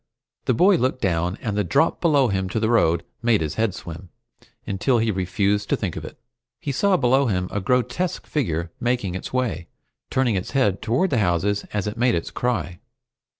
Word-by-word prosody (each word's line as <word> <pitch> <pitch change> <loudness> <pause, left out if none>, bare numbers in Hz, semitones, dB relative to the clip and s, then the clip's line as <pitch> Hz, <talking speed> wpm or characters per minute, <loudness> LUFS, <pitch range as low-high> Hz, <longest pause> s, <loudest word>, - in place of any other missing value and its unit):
The 125 - +2
boy 185 - +5
looked 130 -1 0
down, 90 0 0
and 105 -2 -2
the 105 - +1
drop 95 - +1
below 145 -7 +3
him 95 -1 -1
to 110 - -1
the 110 +1 +1
road 85 -7 +3 0.2
made 115 -4 +3
his 75 -2 -2
head 110 -4 0
swim, 85 +2 -9 0.6
until 105 +6 +1
he 115 -1 +1
refused 100 +2 0
to - - +3
think 95 -6 -3
of - - -6
it. 155 - -9 0.4
He 140 - -3
saw 195 +7 +2
below 135 +1 +3
him 90 -4 0
a 100 - -2
grotesque 125 - 0
figure 85 - -2
making 120 -6 -1
its 95 - -5
way, 125 -9 -2 0.4
turning 130 -3 +1
its 95 -2 -2
head 100 -8 +2
toward 125 +12 +1
the 125 - +2
houses 100 +2 +1
as 105 -2 -2
it 105 +2 -4
made 120 0 +3
its 85 - -3
cry. 110 -8 -2
105 Hz, 195 wpm, -23 LUFS, 95-125 Hz, 0.6 s, boy